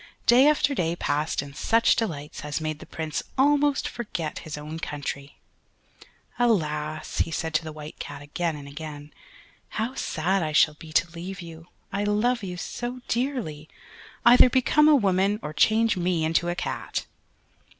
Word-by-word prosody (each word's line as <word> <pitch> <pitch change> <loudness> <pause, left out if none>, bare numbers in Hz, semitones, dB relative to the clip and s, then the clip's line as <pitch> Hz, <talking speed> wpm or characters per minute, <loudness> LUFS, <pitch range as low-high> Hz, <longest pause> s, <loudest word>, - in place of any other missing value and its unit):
Day 250 +4 +7
after 290 -2 +3
day 170 -8 0
passed 150 -2 -1
in 140 0 -10
such 230 +10 +3
delights 150 -10 -4
as 150 +1 -2
made 155 -1 -3
the - - -11
Prince 160 -2 -3 0.2
almost 285 +1 +3
forget 175 -10 -4
his 155 -2 -7
own 155 +2 -6
country. 145 -2 -5 1.0
"Alas!" 155 -9 0
said 160 0 -3
he - - +5
to - - -15
the 160 - -6
White 155 0 -10
Cat 145 - -6
again 160 +2 -2
and 145 -1 -9
again, 150 0 -8 0.6
"how 225 +4 -1
sad 190 -4 0
I 155 -2 -2
shall 150 +1 +5
be 155 +1 -12
to 165 +2 +2
leave 180 +3 -7
you! 165 -1 -10 0.3
I 200 +1 0
love 220 +4 +1
you 180 -3 -5
so 245 +6 -5
dearly! 235 - -2 0.6
Either 245 +1 +8
become 270 +4 +4
a 305 - +7
woman, 200 -3 +2
or 150 - -5
change 225 +5 +3
me 175 -3 0
into 165 +2 +1
a 175 - -1
cat!" - - -3
170 Hz, 165 wpm, -26 LUFS, 155-230 Hz, 1.0 s, Either